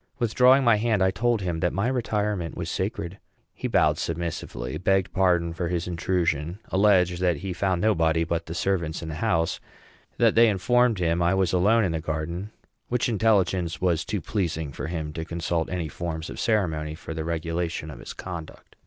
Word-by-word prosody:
Withdrawing 125 +2 +4
my 115 -3 +5
hand, 110 -3 +1
I 95 - +3
told 115 +3 +1
him 85 -3 -2
that 90 +1 0
my 100 +5 0
retirement 105 -8 -1
was - - -3
sacred. 85 +4 -3 0.3
He - - -4
bowed - - +3
submissively; 80 -6 -4
begged 95 0 +1
pardon 85 -3 +2
for 85 +1 -2
his 85 0 -2
intrusion; 85 -2 -1
alleged 95 -3 +3
that 90 -4 +2
he 95 - -2
found 95 0 0
nobody 80 -6 +3
but 85 0 -2
the 80 - -5
servants 85 -4 -1
in 80 - -5
the - - -4
house; 80 -8 +1 0.6
that - - +4
they 115 0 +6
informed 115 +4 +2
him 85 -1 +1
I 85 +2 +3
was 95 -2 +1
alone 105 +6 +4
in 90 - 0
the 80 -1 -2
garden 85 +5 -3 0.4
which 125 -1 0
intelligence 95 -6 +1
was 85 -3 +1
too 105 -4 -3
pleasing 80 -5 -2
for 70 - -5
him 80 -3 -4
to 80 - -4
consult 85 0 -2
any 85 -3 -2
forms 80 +2 -5
of - - -8
ceremony 80 -8 0
for 80 - -7
the 80 0 -3
regulation 85 -1 -3
of - - -10
his - - -8
conduct. 85 -4 -9
90 Hz, 190 wpm, -25 LUFS, 80-100 Hz, 0.6 s, they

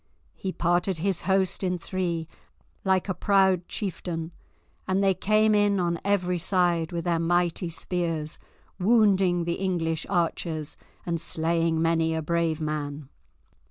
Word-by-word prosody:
He 190 - -4
parted 175 +1 +1
his 190 +2 -1
host 190 0 +2
in 180 -1 0
three 170 -2 -3 0.6
like 190 -1 +2
a 190 - 0
proud 190 -1 +2
chieftain, 170 -4 -4 0.6
and 190 +1 +1
they 195 -1 +4
came 215 +3 +3
in 205 -1 +3
on 170 -1 0
every 180 -3 +1
side 175 -2 +1
with 170 -1 -3
their 170 -2 +1
mighty 175 +1 +1
spears, 165 -2 -3 0.4
wounding 195 -4 +3
the 170 0 -2
English 165 -4 -1
archers 165 -4 -1 0.3
and 170 -2 -1
slaying 165 0 +1
many 165 0 +2
a 160 - -2
brave 165 0 0
man. 150 -2 -4
175 Hz, 135 wpm, -26 LUFS, 165-190 Hz, 0.6 s, they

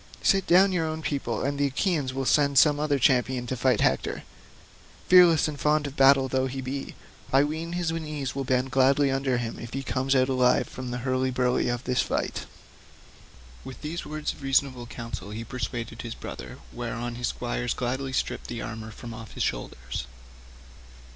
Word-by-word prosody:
Sit 195 -2 +3
down 190 +3 +6
your 170 -3 0
own 160 0 -4
people, 130 -7 -2
and 140 +1 -1
the 145 - +3
Achaeans 145 -1 0
will 135 +1 -3
send 140 0 +3
some 145 0 +6
other 150 -1 +1
champion 125 -1 +2
to 130 - -3
fight 125 -2 +2
Hector; - - 0 0.8
fearless 175 -4 +7
and 150 -2 -5
fond 150 0 +2
of 140 -1 -6
battle 135 -1 +6
though 130 0 0
he 135 +1 -5
be, 135 +1 -5 0.4
I 135 +1 +5
ween 160 +3 -3
his 175 -2 -1
knees 150 -4 -4
will 135 - -2
bend 130 0 0
gladly 135 +1 +4
under 135 -1 0
him 120 -2 -4
if 120 - -8
he 135 +1 -3
comes 135 +1 0
out 130 -1 +4
alive 130 -2 +3
from 130 -1 -7
the 125 - -3
hurly 130 0 +1
burly 125 -1 +1
of 120 +1 -2
this 125 -1 +1
fight." - - -2 1.2
With 130 - -10
these 160 +3 -4
words 155 0 -3
of - - -16
reasonable 135 -2 +1
counsel 115 -6 -7
he 110 +2 -5
persuaded 115 -1 -5
his 115 -1 -6
brother, - - -8 0.2
whereon 120 0 -4
his 120 0 -2
squires - - -2
gladly 130 +2 -2
stripped 130 - -2
the 120 - -5
armour 110 -2 -6
from 115 +1 -9
off 110 -2 -10
his - - -2
shoulders. - - -4
130 Hz, 185 wpm, -26 LUFS, 125-145 Hz, 1.2 s, fearless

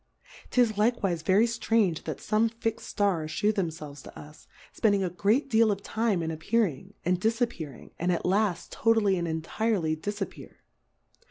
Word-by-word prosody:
Tis 245 -3 +3
likewiie 210 -6 +1
very 190 +7 +4
jftrange 225 -6 +1
that 155 -4 -3
fome 220 +1 +1
lix'd 225 - 0
Stars 175 -7 0
Ihew 210 +6 +2
themfelves 160 -7 -4
to - - -12
us, 150 +1 -14 0.3
fpending 200 -4 +2
a 175 - -3
great 210 - +1
deal 225 -3 +4
of 200 0 -3
time 220 -6 0
in 160 - -2
appearing, 185 - -1
and 180 +1 +1
difappear 220 - -1
ing, - - -15
andatlaft, 180 +2 0
totally 220 -4 +3
and 170 -2 -2
entirely 165 +1 -1
dif 205 +6 -5
appear. 195 - -7
195 Hz, 155 wpm, -28 LUFS, 165-220 Hz, 0.3 s, very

